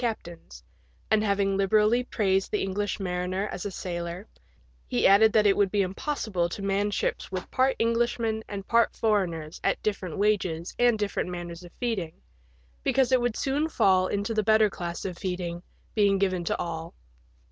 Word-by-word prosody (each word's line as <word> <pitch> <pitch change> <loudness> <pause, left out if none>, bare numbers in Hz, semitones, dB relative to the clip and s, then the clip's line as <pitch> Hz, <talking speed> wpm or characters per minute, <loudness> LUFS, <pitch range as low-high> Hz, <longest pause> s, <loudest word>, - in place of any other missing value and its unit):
captains, 170 - -5 0.5
and 215 -1 +4
having 200 -1 +1
liberally 210 +4 +3
praised 195 -6 0
the 210 - -1
English 200 +2 -2
mariner 185 +1 -2
as 190 - -4
a - - -4
sailor, 175 +2 -5 0.6
he 120 - 0
added 215 +3 +7
that 215 0 +3
it 200 - +5
would 200 -1 +2
be 200 0 +2
impossible 190 - -2
to 195 +3 -6
man 200 +1 +1
ships 205 - -2
with 185 -1 -5
part 260 +1 +2
Englishmen 230 -1 0
and 200 -2 -6
part 235 0 +3
foreigners 175 -8 -1
at - - +1
different 195 -5 -2
wages 190 -5 0
and 240 -2 +4
different 205 -3 -2
manners 175 -1 -6
of 175 - -12
feeding, 210 -10 -2 0.7
because 265 - +2
it 255 -1 +4
would 240 -2 0
soon 290 +4 0
fall 185 -9 +3
into 205 +4 -2
the 215 - +2
better 215 0 +4
class 175 -2 -5
of 180 -3 -5
feeding 180 -3 -3 0.3
being 200 -2 +3
given 185 -2 0
to - - 0
all. 165 -1 -5
195 Hz, 170 wpm, -27 LUFS, 180-220 Hz, 0.7 s, added